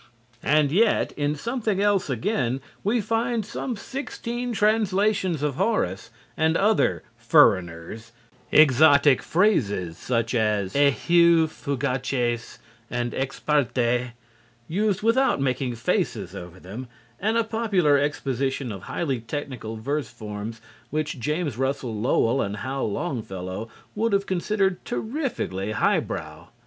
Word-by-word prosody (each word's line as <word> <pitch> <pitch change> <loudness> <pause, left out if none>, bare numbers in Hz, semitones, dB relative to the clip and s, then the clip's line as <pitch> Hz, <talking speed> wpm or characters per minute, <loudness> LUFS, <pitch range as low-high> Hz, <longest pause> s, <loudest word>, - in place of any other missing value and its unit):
And 150 -1 +3
yet 215 +6 +3
in 145 0 -1
"Something 225 - -2
Else 200 -5 +2
Again" 130 - 0 0.2
we 220 +3 +1
find 225 +1 -1
some 240 +3 -4
sixteen 245 0 -5
translations 205 - +1
of 145 -3 -1
Horace 100 - 0 0.3
and 160 +1 +2
other 215 +2 +2 0.2
"furriners," 90 +6 +2 0.4
exotic 145 -1 +6
phrases 105 - +1
such 115 -1 -1
as 105 -4 +1
"eheu 165 +4 +4
fugaces" 125 -4 -2 0.3
and 120 -1 -2
"ex 135 +1 -3
parte" 125 -4 +1 0.5
used 205 +3 0
without 245 - +3
making 130 -2 -1
faces 115 - -1
over 90 +1 -9
them, 105 +9 -8 0.3
and 220 +3 +1
a 230 - +3
popular 205 -10 +2
exposition 135 -3 -1
of 100 -3 -7
highly 140 -7 -2
technical 115 -2 -5
verse 140 +4 -2
forms 105 +1 -7 0.3
which 150 -2 -2
James 150 -1 -2
Russell 135 -3 -1
Lowell 115 +3 +2
and 100 +1 -3
Hal 130 -1 -2
Longfellow 105 - -4 0.2
would 225 +1 0
have 200 0 +2
considered 190 0 0
terrifically 225 - -3
high - - +3
brow. - - -7
145 Hz, 120 wpm, -25 LUFS, -, 0.5 s, exotic